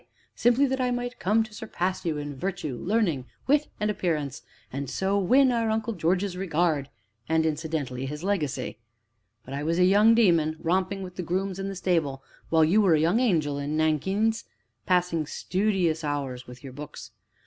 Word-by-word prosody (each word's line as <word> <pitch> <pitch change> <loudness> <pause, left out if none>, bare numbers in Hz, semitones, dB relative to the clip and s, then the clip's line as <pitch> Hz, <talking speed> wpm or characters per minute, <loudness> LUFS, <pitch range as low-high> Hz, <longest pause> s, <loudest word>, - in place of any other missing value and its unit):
simply 245 +4 +3
that 265 -1 -1
I 250 - +1
might 245 0 -3
come 210 +4 +2
to 220 -1 -12
surpass 190 -5 -3
you 155 -2 0
in 145 -1 -5
virtue, 165 -3 -3
learning, 170 - 0 0.2
wit, 290 +2 +3
and 210 0 +1
appearance, 150 -8 -2 0.3
and 140 0 -4
so 195 +6 0
win 255 +7 +4
our 230 -2 +1
Uncle 220 +1 -1
George's 185 +1 0
regard, 165 -6 0 0.4
and, 160 0 +2
incidentally, 150 -5 -2
his 150 +4 -6
legacy. 145 - -2 0.7
But 130 - -8
I 140 - -3
was 165 +3 0
a 180 - +5
young 210 +4 +6
demon, 170 -8 +3
romping 190 +3 0
with 180 -1 -9
the - - -2
grooms 185 +2 -2
in 195 - -3
the 195 - -5
stable, 160 -7 0 0.3
while 160 -1 +5
you 195 +7 +4
were 185 -6 +5
a - - +2
young 170 +9 +3
angel 155 - +1
in 145 +2 -2
nankeens, 190 +9 +1 0.4
passing 175 -4 +1
studious 180 -4 0
hours 135 -4 -3
with 125 +1 -12
your 135 -2 -8
books. 150 +2 -9
175 Hz, 180 wpm, -26 LUFS, 150-205 Hz, 0.7 s, young